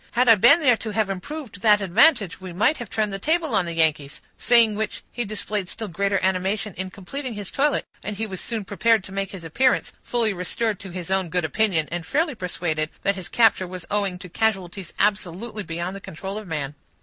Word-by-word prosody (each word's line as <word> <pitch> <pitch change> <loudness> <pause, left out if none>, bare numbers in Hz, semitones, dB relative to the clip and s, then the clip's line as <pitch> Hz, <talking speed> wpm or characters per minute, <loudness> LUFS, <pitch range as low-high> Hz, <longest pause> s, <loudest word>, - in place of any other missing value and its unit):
"Had 250 +1 +3
I 230 - +10
been 235 - +6
there 250 -6 +5
to 220 - -5
have 215 -2 0
improved 235 +1 -7
that 210 -2 +5
advantage, 200 - +3
we 185 -2 -7
might 215 - +2
have 240 -4 -7
turned 215 -2 -1
the 195 - -3
table 320 - +1
on 195 -4 +3
the 170 - -4
Yankees"; 155 -3 +1 0.2
saying 235 -3 +5
which 215 +1 -3
he 240 - -2
displayed 210 -2 -3
still 220 -1 -5
greater 195 +2 0
animation 190 +2 0
in 190 0 -4
completing 235 +7 -6
his 205 -2 -5
toilet; 290 +1 +1 0.2
and 210 0 -5
he 220 - -1
was 190 -4 -6
soon 225 -4 -3
prepared 220 +1 +2
to 190 - -11
make 195 0 -3
his 190 -3 -8
appearance, 250 +11 +1
fully 230 -4 0
restored 200 +3 -2
to 195 - -9
his 180 0 -6
own 190 -2 +1
good 180 -1 0
opinion, 170 -4 +1
and 170 -1 -4
fairly 310 - +1
persuaded 170 -6 -2
that 200 - +3
his 190 -2 -7
capture 225 -5 +3
was 180 -1 -7
owing 200 -3 0
to 180 - -10
casualties 190 -2 -2
absolutely 210 +2 -1
beyond 175 +1 -4
the 195 - -8
control 195 +4 -6
of 215 - -11
man. 150 -4 -3
200 Hz, 215 wpm, -23 LUFS, 180-225 Hz, 0.2 s, I